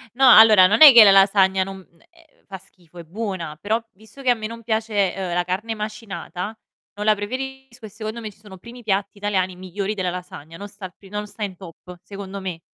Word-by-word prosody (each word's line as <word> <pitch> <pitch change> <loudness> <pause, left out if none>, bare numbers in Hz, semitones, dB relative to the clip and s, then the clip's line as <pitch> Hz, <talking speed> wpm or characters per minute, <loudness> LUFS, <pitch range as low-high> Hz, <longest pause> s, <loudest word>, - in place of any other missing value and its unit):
No, 265 -1 +5
allora 215 -5 +8
non 210 +8 0
è 295 -3 +12
che 235 -3 +9
la 200 - +7
lasagna 195 -1 +4
non 195 0 -9 0.3
eh 335 -1 -24 0.2
fa 195 -1 -9
schifo, 180 -2 -22
è 170 - -9
buona. 185 -4 -6
Però 220 +3 -1
visto 220 +7 -16
che 255 - -1
a - - +6
me 220 -2 -7
non 230 +1 -10
piace, 220 -4 -1
uhm, 185 -3 -4
la 175 0 -1
carne 205 +5 -3
macinata 210 -1 -7 0.4
non 210 +1 -5
la 215 -1 +4
preferisco 255 +2 -7
e - - -9
secondo 220 +2 -7
me 220 -2 -7
ci 200 - -20
sono 205 -3 -14
primi 235 +5 -13
piatti 200 0 -2
italiani 190 -3 -2
migliori 190 +3 -5
della 185 -3 -3
lasagna, 165 -3 -9
non 205 - -8
sta 205 -1 -17
al 180 -2 -7
pri 195 - -17
non 210 +1 -5
sta 210 - -8
in 190 -3 -5
top, 180 0 -13
secondo 195 -1 -9
me. 180 -3 -6
205 Hz, 225 wpm, -21 LUFS, 185-220 Hz, 0.4 s, è